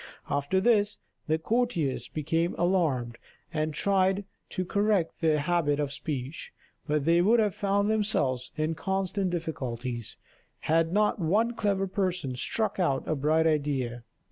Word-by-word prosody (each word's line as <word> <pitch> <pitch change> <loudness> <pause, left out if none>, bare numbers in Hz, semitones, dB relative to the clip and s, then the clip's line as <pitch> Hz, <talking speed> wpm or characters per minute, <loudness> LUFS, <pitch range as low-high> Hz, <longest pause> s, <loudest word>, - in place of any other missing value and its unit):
After 145 +6 +1
this, 210 0 +3 0.3
the 155 0 +2
courtiers 175 - 0
became 165 +3 -1
alarmed, 150 -10 +1 0.3
and 155 0 0
tried 195 +3 +1 0.2
to 185 - -3
correct 200 -3 0
their 160 -2 +3
habit 150 -1 +1
of 145 -1 -1
speech; 140 0 -5 0.4
but 150 -2 0
they 170 +1 +4
would 225 +6 +4
have 210 -3 +2
found 200 0 +1
themselves 175 - 0
in 155 0 0
constant 190 +2 -1
difficulties, 125 -8 -4 0.4
had 165 +1 +2
not 210 +2 +2
one 210 +8 +2
clever 200 -4 0
person 180 -8 -2
struck 215 - -1
out 140 -7 +1
a - - +1
bright 155 +3 +2
idea. 140 -6 0
165 Hz, 140 wpm, -28 LUFS, 145-195 Hz, 0.4 s, they